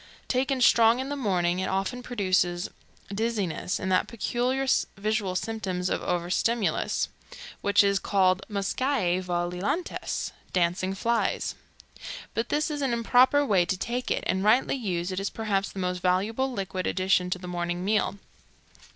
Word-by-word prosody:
Taken 260 +1 0
strong 235 0 +6
in 265 +1 -3
the 285 - -2
morning, 180 -8 +1
it 190 - -1
often 195 +6 -1
produces 185 -7 0 0.4
dizziness 205 -5 -1
and 190 - -2
that 185 - +3
peculiar 245 +3 -1 0.3
visual 205 -2 -1
symptom 195 -3 -2
of 180 - -1
overstimulus 180 +6 0 0.5
which 200 0 +4
is 200 -1 +2
called 185 -2 +2
muscae 200 -2 0
volilantes 180 - -2 0.2
dancing 180 +2 +1
flies. 230 +3 0 0.8
But 230 +1 -2
this 305 +2 0
is 295 -1 -3
an 265 -3 +1
improper 250 +5 +4
way 195 -8 +4
to 185 +2 -1
take 245 +5 -3
it, - - 0
and 190 +1 0
rightly 220 +5 +4
used 185 -8 -2
it 185 - -2
is 195 - -2
perhaps 200 -3 -1
the - - -13
most 180 -1 -1
valuable 210 +9 +1
liquid 190 -5 -3
addition 185 -1 +2
to 180 - -1
the 180 0 -9
morning 175 0 -3
meal. 210 -1 +1
195 Hz, 150 wpm, -27 LUFS, 185-235 Hz, 0.8 s, strong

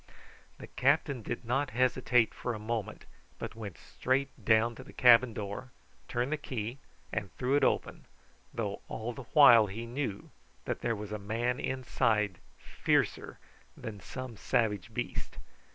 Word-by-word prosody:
The - - -9
captain 140 -1 +1
did 120 +3 -5
not 135 +4 0
hesitate 125 -2 +3
for 125 - -3
a - - -6
moment, 110 -2 -4 0.3
but - - -6
went 105 -7 -7
straight 130 - -1
down 110 +1 +4
to - - -10
the - - -14
cabin 120 0 +6
door, 105 +4 -5 0.4
turned 120 +3 -1
the 155 - +1
key, 120 -1 -5 0.3
and 100 -2 -3
threw 130 +2 +1
it 145 - +3
open, - - 0 0.5
though 105 -3 -3
all 115 +2 -4
the 130 +1 -9
while 120 -7 +9
he 110 +4 -6
knew 120 -4 -4 0.3
that - - -3
there 115 -1 0
was 105 0 -7
a 105 - -3
man 115 +5 -1
inside 110 -6 0 0.2
fiercer - - 0 0.4
than 105 -2 -7
some 125 +3 -7
savage 105 -4 0
beast. - - -4
115 Hz, 150 wpm, -31 LUFS, 105-130 Hz, 0.5 s, while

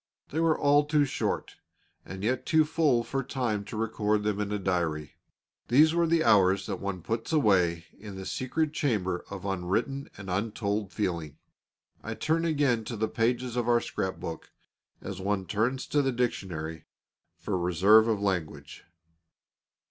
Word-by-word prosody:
They 155 - -2
were 165 -1 +3
all 145 +1 +4
too 150 -1 +3
short, - - -3 0.5
and 95 +1 -8
yet 125 +4 0
too 160 -1 +3
full 150 -6 +2
for 135 +4 -2
time 125 -6 -2
to 110 - -7
record 105 -1 0
them 105 -1 -1
in 105 0 -2
a 105 - 0
diary. 85 -6 -1 0.6
These 150 +7 +5
were 170 0 +2
the 165 0 +3
hours 95 -4 +4
that 95 -4 -4
one 100 -3 -4
puts 115 - -3
away 90 - +2
in 105 -2 -9
the 95 0 -7
secret 150 +7 -1
chamber 100 - -1
of 100 -1 -7
unwritten 95 +9 -2
and 100 -1 -9
untold 100 +1 -2
feeling. 85 -8 -3 0.6
I 110 +1 -5
turn 160 +7 0
again 140 -8 +1
to 115 - -5
the 110 +1 0
pages 120 +2 -1
of 120 -1 0
our 120 0 +5
scrap 95 -4 -4
book, 80 - -6 0.5
as 95 -2 -6
one 100 -1 -1
turns 115 +8 -1
to 145 - +3
the 135 -1 +1
dictionary, 85 -10 -3 0.5
for - - -3
reserve 95 +5 +5
of 110 -3 +1
language. 80 -8 -3
105 Hz, 165 wpm, -28 LUFS, 95-130 Hz, 0.6 s, These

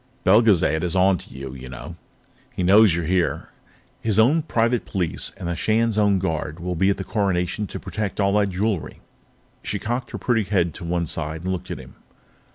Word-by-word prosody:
"Belgezad 95 -6 +4
is 90 0 -1
on 95 -1 +4
to - - -13
you, 65 -1 -7
you 65 -1 -9
know. - - -8 0.6
He 90 - -1
knows 100 0 +6
you're 85 -1 -2
here. 90 +1 0 0.5
His 110 -3 0
own 135 +9 +5
private 120 -3 +1
police 90 -5 -2
and 90 - -5
the 85 - -1
Shan's 110 +3 +1
own 105 -2 +3
Guard 80 -3 -3
will 90 +1 -3
be 95 +3 +2
at 100 - +1
the 95 - -4
Coronation 100 -1 -1
to - - -7
protect 105 -2 -4
all 100 -1 +2
that 100 -1 +1
jewelry." 95 -1 -2 0.6
She 100 - -3
cocked 120 +6 -3
her - - -5
pretty 115 -4 +1
head 90 -5 +1
to - - -9
one 85 0 -1
side 80 +1 -4
and 95 - -1
looked 95 0 -4
at - - -4
him. 65 0 -12
95 Hz, 200 wpm, -23 LUFS, 85-105 Hz, 0.6 s, knows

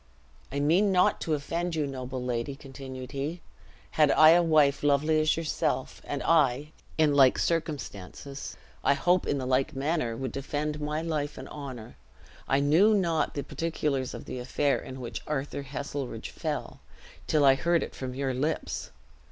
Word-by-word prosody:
"I 140 - -2
mean 175 +8 +3
not 180 -1 +3
to 155 - 0
offend 170 +4 -3
you, 155 -2 0
noble 130 -2 -5
lady," 125 +2 -2
continued 130 -2 -9
he; 145 +5 -3 0.5
"had 150 -2 +4
I 155 +2 +7
a 175 +1 +6
wife 155 -4 +3
lovely 150 +2 +3
as 155 +1 +2
yourself, 150 -5 -2
and 145 - -3
I 150 -2 +2 0.3
in 155 -2 +4
like 135 -2 +6
circumstances, 140 - -3 0.3
I 140 - +4
hope 180 +4 +2
in 145 - +1
the 130 - -3
like 130 +1 +1
manner 135 -4 -1
would 130 -1 -3
defend 150 +2 -3
my 150 +2 -2
life 150 -3 -2
and - - -8
honor. 130 -6 -8 0.5
I 135 - +3
knew 175 +10 +5
not 170 -5 +1
the 140 - -2
particulars 150 -4 -2
of - - -8
the 125 - -5
affair 135 +3 0
in 130 0 -8
which 120 - -5
Arthur 140 -1 -3
Heselrigge 135 -3 -5
fell, - - -4 0.5
till 150 -2 +3
I 135 - +8
heard 170 +5 +1
it - - -7
from 130 -1 -6
your 135 -1 -1
lips. 145 +6 -2
145 Hz, 170 wpm, -28 LUFS, 135-155 Hz, 0.5 s, I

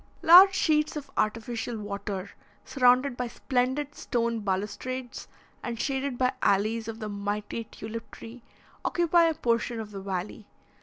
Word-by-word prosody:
Large 375 +4 +9
sheets 305 -3 +2
of 290 -2 -7
artificial 230 +2 -2
water, 200 -2 -5 0.3
surrounded 255 0 +3
by 245 0 -3
splendid 260 +4 -1
stone 235 -4 -1
balustrades, 210 +6 -4 0.3
and 235 -2 -5
shaded 270 -1 -2
by 255 +1 +1
alleys 215 +3 +1
of 225 -1 -5
the 215 -2 -5
mighty 205 +2 -4
tulip 225 +1 -8
tree, 235 +2 -11 0.4
occupy 345 -1 +3
a 325 -1 +1
portion 235 -1 0
of 215 -1 -7
the 195 -1 -7
valley. 195 +2 -5
235 Hz, 140 wpm, -27 LUFS, 210-265 Hz, 0.4 s, Large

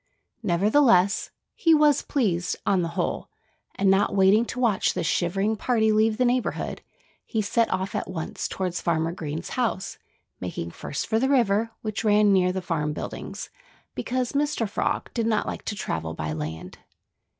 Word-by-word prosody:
Nevertheless, 205 +1 +3 0.2
he 330 -2 +4
was 295 -2 +4
pleased, 180 -10 0
on 190 -2 +3
the 170 - -1
whole. - - -2 0.5
And 195 -1 +3
not 200 +1 +2
waiting 200 +4 +5
to 250 - -6
watch 230 -6 +2
the - - -1
shivering 195 +6 0
party 220 -1 +2
leave 215 0 +3
the 250 - +2
neighborhood, 245 0 -1 0.4
he 225 - -3
set 230 +3 +1
off 190 +1 -2
at - - -3
once 165 -3 -4
toward 185 -2 -3
Farmer 165 -2 0
Green's 160 -1 -5
house, 235 -6 -2 0.4
making 85 -2 -5
first 140 - -4
for 220 -1 +1
the 265 +3 +1
river, 225 -5 +3
which 215 -1 -3
ran 210 -1 +4
near 180 -1 +3
the 185 0 -4
farm 150 -4 -1
buildings, - - -6 0.4
because 250 -1 -2
Mr. 285 -5 0
Frog 200 - -2
did 230 -2 0
not 215 -2 +1
like - - -5
to 210 - -3
travel 80 - -3
by 75 0 -3
land. 80 +1 -6
200 Hz, 165 wpm, -25 LUFS, 175-230 Hz, 0.5 s, waiting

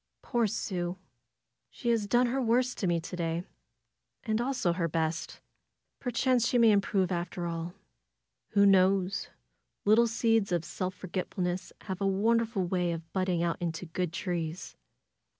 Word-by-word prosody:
"Poor 240 -3 +1
Sue! 180 -4 -3 0.7
She 240 - -4
has 225 -3 +2
done 240 +4 +4
her 260 +3 0
worst 245 +1 +1
to 190 - 0
me 170 -1 +2
to 170 +2 -7
day, 170 0 -2 0.8
and 220 -1 0
also 245 -9 0
her 170 -1 0
best. 160 0 -2 0.6
Perchance 245 -1 +1
she 245 - +2
may 230 -2 +6
improve 195 -2 +2
after 175 0 -3
all. 170 +1 -4 0.8
Who 200 -1 +5
knows? 190 -1 +3 0.6
Little 220 +3 +5
seeds 225 -3 +2
of 170 -2 0
self 185 +2 -4
forgetfulness 180 0 -3
have 190 -1 -5
a 195 - +2
wonderful 220 +1 +1
way 175 -1 0
of 165 0 -8
budding 185 -3 +1
out 170 +1 -1
into 170 0 -3
good 175 0 -2
trees." 170 -1 -4
185 Hz, 150 wpm, -30 LUFS, 175-225 Hz, 0.8 s, may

